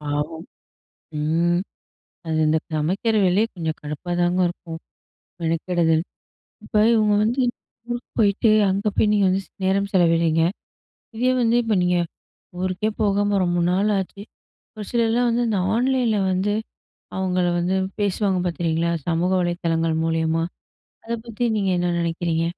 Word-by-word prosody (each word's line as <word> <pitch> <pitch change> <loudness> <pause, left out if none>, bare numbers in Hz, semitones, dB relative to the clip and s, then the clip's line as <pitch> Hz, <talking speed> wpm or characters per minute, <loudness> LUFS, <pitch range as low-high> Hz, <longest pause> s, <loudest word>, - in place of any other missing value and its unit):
பாவம்! 150 +2 -3 0.8
ம். 170 +3 +1 0.7
அது, 160 -1 -1
இந்த 155 +1 +3
சமைக்கிற 185 +9 0
வேலையே 195 +5 +3
கொஞ்ச 165 -3 -2
கடுப்பாதாங்க 175 +4 -1
இருக்கும். 165 -2 -8 0.6
மெனக்கெடுதல் 165 0 +1 0.6
இப்ப - - -10 0.2
இவங்க 215 -2 +3
வந்து 245 +4 +1 0.5
ஊருக்கு 240 +1 -5
போய்ட்டு, 210 +1 +3 0.2
அங்க 200 +2 -1
போயி - - +3
நீங்க 205 -2 +3
வந்து 190 +1 +1
ஸ் - - -30
நேரம் 200 +1 +1
செலவிடுறீங்க. 165 -2 +3 0.8
இதே 250 +2 +2
வந்து 230 +1 +3
இப்ப, 225 -2 0
நீங்க 180 0 +2 0.6
ஊருக்கே 185 +3 -1
போகாம, 205 -1 +2
ரொம்ப 175 0 0
நாள் 195 +3 +2
ஆச்சு 195 +1 -5 0.6
ஒரு 210 - -5
சிலர்லாம் 235 +1 +2
வந்து 240 +1 +1
இந்த 205 -3 0 0.2
ஆன்லைன்ல 245 -3 +1
வந்து, 195 +3 0 0.6
அவுங்கள 185 -1 0
வந்து 180 +2 0 0.2
பேசுவாங்க 200 -1 +1
பாத்திருக்கீங்களா, 170 -1 0 0.2
சமூக 175 +2 +1
வலைதளங்கள் 165 -2 0
மூலியமா. 165 0 0 0.6
அத 230 - -5
பத்தி 235 +1 -3
நீங்க 195 -2 0
என்ன 175 0 0
நெனைக்கிறீங்க? 165 -1 -1
180 Hz, 130 wpm, -22 LUFS, 165-210 Hz, 0.8 s, இந்த